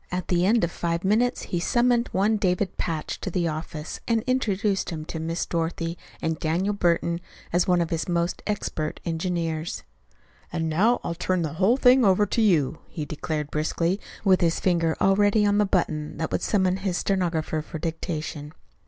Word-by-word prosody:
At 180 0 -3
the 180 0 +3
end 225 +2 +3
of 170 - +1
five 170 0 -2
minutes 220 +6 +2
he 175 - -2
summoned 240 +5 +2
one 210 +3 +2
David 185 -1 0
Patch 160 -3 -3
to - - -3
the 175 -1 0
office, 155 -1 -5
and 230 -2 +2
introduced 210 -6 0
him 155 -3 -5
to 160 - -5
Miss 165 +2 -2
Dorothy 165 0 -2 0.3
and 160 -1 -1
Daniel 175 +6 0
Burton 170 -2 +1 0.3
as 175 0 +3
one 180 -1 +3
of 170 - -2
his 165 +2 -2
most 170 0 0
expert 165 -7 -2
engineers. 165 -1 -2 0.7
"And 165 -1 -1
now 205 +10 +2
I'll - - -2
turn 180 +1 0
the 150 -3 -3
whole 195 +9 +3
thing 255 -1 +6
over 200 0 +4
to 230 - 0
you," 165 -9 +2
he 155 - -5
declared 150 -1 -4
briskly, 165 +5 0 0.3
with 190 -2 +5
his 170 -1 +2
finger 170 -3 +1
already 205 +2 +4
on 205 0 +3
the 210 - +4
button 155 -5 -1
that 160 - -2
would - - 0
summon 190 -3 +2
his 190 -2 -2
stenographer 170 -5 0
for 160 - -7
dictation. 160 -2 -4
175 Hz, 180 wpm, -25 LUFS, 160-200 Hz, 0.7 s, thing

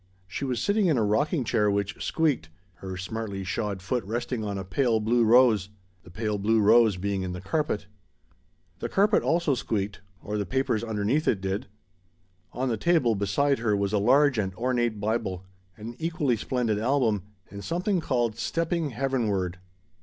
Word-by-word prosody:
She 95 +8 -5
was 125 -3 -1
sitting 200 - +2
in 155 -6 +3
a 115 - +2
rocking 140 - +1
chair 105 -2 +1
which 100 0 -2
"squeaked" 150 - 0 0.3
her 95 0 -6
smartly 100 0 -4
shod 100 0 -3
foot 125 +5 -1
resting 120 +3 -3
on 100 -1 -3
a 95 - -4
pale 110 +5 +1
blue 115 +2 +2
rose 115 -4 +5 0.3
the - - -16
pale 105 +2 -2
blue 110 +3 +2
rose 110 -1 +5
being 100 +1 -2
in 90 -1 -4
the 90 - -5
carpet. 105 - -2 0.9
The - - -3
carpet 200 +2 +3
also 165 -3 +1
squeaked 105 -5 -3 0.2
or 105 0 -3
the 100 - -1
papers 130 -4 0
underneath 110 +7 0
it 100 - +2
did. 95 +5 -3 0.8
On 130 +1 -2
the 115 -3 0
table 155 -4 +3
beside 110 +8 +1
her 110 -3 +1
was 100 0 -1
a 105 - +3
large 130 +4 +4
and 95 -2 -2
ornate 120 -2 0
Bible, 100 -4 -2 0.3
an 115 +3 -8
equally 160 -6 0
splendid 115 -2 -1
album, 115 -4 +1 0.3
and 100 0 -8
something 180 +3 0
called 120 -6 -1
"Stepping 165 +4 -1
Heavenward." 110 -9 -1
110 Hz, 170 wpm, -26 LUFS, 100-130 Hz, 0.9 s, rose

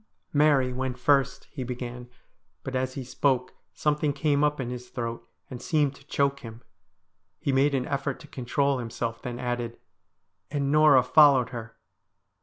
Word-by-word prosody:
' - - -51
Mary 145 -4 +3
went 130 0 -3
first,' 135 +1 +2
he 130 - -5
began, 125 0 -6 0.5
but 130 - -5
as 130 0 -1
he 135 - -4
spoke 130 0 0 0.2
something 150 -1 0
came 145 0 +1
up 150 0 +1
in 125 -2 -3
his 125 0 -7
throat 115 -2 -5 0.2
and 125 -2 -8
seemed 150 -1 +1
to 140 - -17
choke 140 -2 +1
him. 115 -1 -10 0.8
He 140 - -1
made 140 +2 +3
an 130 -2 0
effort 140 -1 -2
to - - -13
control 140 +2 0
himself, 115 -1 -4
then 120 -2 -5
added, 120 -1 -3 0.7
'And 140 -1 -1
Norah 150 -4 +6
followed 140 -2 +5
her.' 115 -3 -8
130 Hz, 165 wpm, -27 LUFS, 125-140 Hz, 0.8 s, Norah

